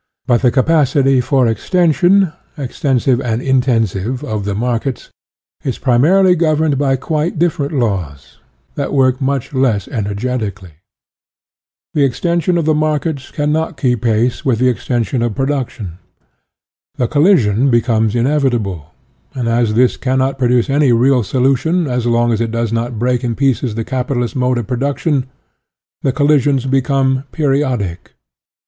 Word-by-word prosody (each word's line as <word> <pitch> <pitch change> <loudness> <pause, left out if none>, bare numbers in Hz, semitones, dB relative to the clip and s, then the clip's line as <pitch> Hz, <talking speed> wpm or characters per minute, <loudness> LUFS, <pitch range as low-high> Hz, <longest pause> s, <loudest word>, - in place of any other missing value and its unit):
But 120 -2 +2
the 125 - +4
capacity 135 -1 +2
for 130 0 +1
ex 115 -3 -3
tension, 180 +1 +3 0.2
extensive 130 -2 0
and 115 -3 -1
intensive, 125 -4 0
of 105 -3 -4
the 100 -1 -2
markets 120 +3 -3 0.5
is 130 - -3
primarily 175 +10 +3
governed 155 -3 +1
by 135 -2 +2
quite 155 +5 -2
dif 170 0 +1
ferent 140 -1 -2
laws, 85 - -3 0.3
that 140 -1 -3
work 130 -2 +2
much 135 0 -2
less 120 -8 0
energet 115 +2 -3
ically. 100 -4 -6 1.2
The 145 - +2
extension 170 +6 0
of 165 - -1
the 155 - +3
markets 150 -2 -1
can 150 0 -2
not 160 +1 -2
keep 125 -5 0
pace 120 +3 0
with 130 -6 +1
the 130 +2 +2
extension 120 0 -2
of 120 -3 -1
produc 135 -2 -1
tion. 95 -7 -9 1.0
The 125 - 0
collision 140 - +3
becomes 115 -2 +1
inevitable, 120 - 0 0.5
and 125 -3 -2
as 115 -2 +1
this 125 +1 +3
cannot 130 +1 -1
produce 125 -2 +2
any 140 -1 +2
real 125 +2 +3
solution 135 - +1 0.2
so 120 - -1
long 120 0 +2
as 110 - -1
it 115 - -1
does 115 0 -2
not 115 0 -2
break 125 +2 0
in 120 -2 -2
pieces 130 -4 0
the 115 - -2
capitalist 125 -1 -2
mode 125 -1 +1
of 120 - -3
production, 140 - -1 0.7
the 135 - +1
collisions 145 -2 +2
become 135 0 +1
periodic. 130 - -2
130 Hz, 150 wpm, -16 LUFS, 115-145 Hz, 1.2 s, the